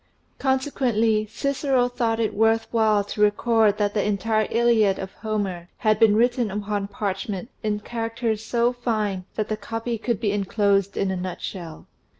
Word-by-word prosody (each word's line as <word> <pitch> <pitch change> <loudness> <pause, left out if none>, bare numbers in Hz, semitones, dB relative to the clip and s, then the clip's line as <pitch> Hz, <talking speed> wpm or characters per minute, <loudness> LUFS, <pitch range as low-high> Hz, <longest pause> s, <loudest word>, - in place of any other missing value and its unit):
Consequently 245 -5 +1
Cicero 270 0 0
thought 230 -2 -1
it 220 -2 0
worth 225 +1 +2
while 215 -3 +3
to 205 +1 -5
record 210 0 +3
that 205 -1 0
the 210 - +1
entire 215 +1 0
Illiad 225 -4 +3
of 190 0 -6
Homer 195 -6 -3
had 215 -2 +2
been 215 -2 +5
written 240 0 +2
upon 205 0 -2
parchment 200 +1 -4
in 210 -1 -1
characters 225 -1 -3
so 240 +2 +1
fine 215 -6 -2
that^the 215 0 -2
copy 225 +1 -3
could 235 -2 -1
be 215 -3 0
enclosed 200 -1 +1
in 195 -1 0
a - - -1
nutshell. 180 -2 -6
215 Hz, 155 wpm, -24 LUFS, 200-230 Hz, -, been